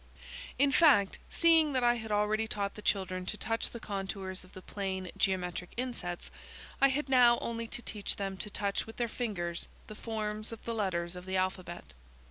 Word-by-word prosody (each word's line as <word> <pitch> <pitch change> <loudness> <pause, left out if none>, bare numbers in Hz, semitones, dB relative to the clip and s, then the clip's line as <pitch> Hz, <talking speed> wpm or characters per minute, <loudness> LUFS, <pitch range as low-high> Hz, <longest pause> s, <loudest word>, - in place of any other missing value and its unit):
In 280 0 +4
fact, 260 -10 +5
seeing 325 -3 +5
that 255 -1 +2
I 240 0 +6
had 225 -2 -5
already 210 +1 +2
taught 200 -2 -1
the 210 - -9
children 185 -3 0
to 210 - -3
touch 225 +1 -1
the 235 - -8
contours 195 -2 -4
of 185 - -18
the 185 - -9
plane 190 -3 -3
geometric 180 -2 0
insets, 235 -9 -4 0.5
I 275 - +8
had 280 +2 0
now 245 -3 +6
only 230 0 -3
to 240 - -5
teach 210 -2 -3
them 195 -1 -3
to 210 - -3
touch 200 0 -1
with 225 - -10
their 240 - +1
fingers 185 -8 -3 0.2
the - - -9
forms 215 -1 -3
of 230 - -9
the 235 - -2
letters 180 -5 -1
of 180 +1 -9
the 190 0 0
alphabet. 185 - -3
210 Hz, 190 wpm, -32 LUFS, 190-235 Hz, 0.5 s, I